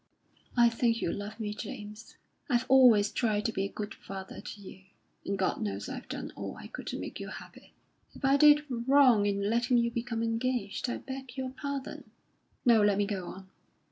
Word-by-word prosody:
"I 240 0 +7
think 230 0 +1
you 170 - -1
love 210 +2 -6
me, 210 -2 -3
James. 210 +1 -8 0.3
I've 245 -1 +2
always 240 -6 +6
tried 215 -4 0
to 225 - +1
be 195 -2 -1
a 200 - -5
good 210 0 -5
father 190 -1 -8
to 210 - -9
you; 190 -1 -11 0.4
and 200 - -2
God 190 +3 0
knows 210 -2 -3
I've - - -7
done - - -5
all - - -6
I - - -10
could - - -9
to - - -3
make - - -6
you - - -6
happy. - - -11 0.4
If - - -4
I 270 +1 +5
did 295 +1 +6
wrong 250 -3 +4
in 200 0 0
letting 240 +3 +2
you 235 0 +2
become 230 -1 -3
engaged, 230 -1 -1
I - - -2
beg 265 -1 -8
your 260 -1 -3
pardon. 280 0 -6 0.6
No; 230 -3 +6
let 205 -1 +3
me 205 - +2
go 195 -3 -3
on." 190 0 -10
230 Hz, 200 wpm, -30 LUFS, 205-255 Hz, 0.6 s, I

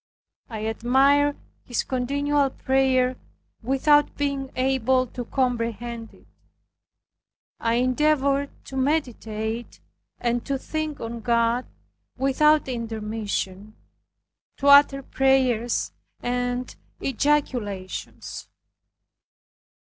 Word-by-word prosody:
I 220 -3 -5
admired 270 +6 +3 0.3
his 245 - -2
continual 280 +2 0
prayer 260 -1 +1 0.4
without 275 +4 +3
being 280 -2 -1
able 260 0 +2
to 245 0 -7
comprehend 235 -2 -2
it. - - -22 1.3
I 230 0 +1
endeavored 280 +2 +2 0.2
to 270 - -9
meditate, 240 -5 -2 0.4
and 240 0 0
to 275 -1 -2
think 310 +1 -4
on 230 +1 -5
God 235 +1 +1 0.5
without 290 +3 +3
intermission, 215 -4 -4 0.8
to 280 - -1
utter 280 -1 +7
prayers 255 -4 +1 0.3
and 245 0 -2 0.2
ejaculations. 245 -9 -2
255 Hz, 80 wpm, -24 LUFS, 230-275 Hz, 1.3 s, utter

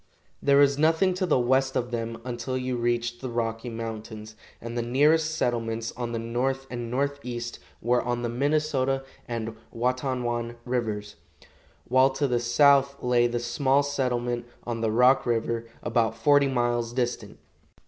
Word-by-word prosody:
There 140 0 +4
was 140 0 +4
nothing 165 +4 +3
to 185 0 -1
the 155 - +3
west 130 +2 +2
of 125 0 -1
them 115 -1 -3
until 125 +1 -3
you 130 0 -2
reached 120 0 -1
the 130 - -4
Rocky 115 0 -2
Mountains, 110 -1 -7 0.2
and 115 +1 -7
the 120 - 0
nearest 150 +6 +3
settlements 115 -4 -1
on 120 -1 -5
the 115 - -2
north 125 +4 -1
and 120 -1 -4
northeast 125 -3 -3 0.2
were 120 +1 +3
on 120 0 -2
the - - 0
Minnesota 135 0 0 0.2
and 115 -2 -4 0.2
Watonwan 120 -1 -1
rivers, 110 -6 -3 0.7
while 130 +2 +5
to 135 +1 -1
the 120 -2 +1
south 140 +3 +4
lay 120 -1 +3
the 120 0 -2
small 135 +4 +2
settlement 120 -4 -1 0.2
on 115 -1 -4
the 110 - +1
Rock 125 +4 +4
river, 115 0 0 0.2
about 115 -2 +1
forty 145 +4 +4
miles 120 -2 0
distant. 120 -1 -2
120 Hz, 155 wpm, -26 LUFS, 115-135 Hz, 0.7 s, while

